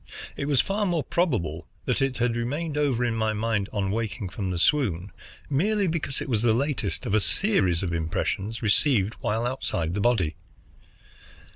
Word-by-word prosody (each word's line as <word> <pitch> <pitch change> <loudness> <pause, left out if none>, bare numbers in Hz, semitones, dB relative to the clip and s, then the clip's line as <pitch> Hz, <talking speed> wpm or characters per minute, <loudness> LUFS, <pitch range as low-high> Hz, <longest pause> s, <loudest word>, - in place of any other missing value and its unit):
It 140 - -3
was 140 -3 +3
far 205 +1 -1
more 170 -4 0
probable 110 - -1 0.2
that - - 0
it 135 -2 0
had 120 -1 +1
remained 145 +7 -2
over 135 -5 +1
in 120 - 0
my 110 -1 0
mind, 110 -2 -1
on 95 -2 -1
waking 105 -3 -3
from 95 +1 -4
the 90 - -2
swoon, 100 - +1 0.4
merely 200 +9 +1
because 160 -5 -1
it - - -4
was 115 -5 +1
the 115 -2 +4
latest 135 -4 -1
of - - -2
a 110 - +5
series 95 - +2
of 90 -2 -2
impressions 95 +7 -2
received 110 -1 +3
while 110 +3 -1
outside 85 -10 -2
the 105 - -1
body. 100 -9 +1
115 Hz, 175 wpm, -26 LUFS, 100-140 Hz, 0.4 s, a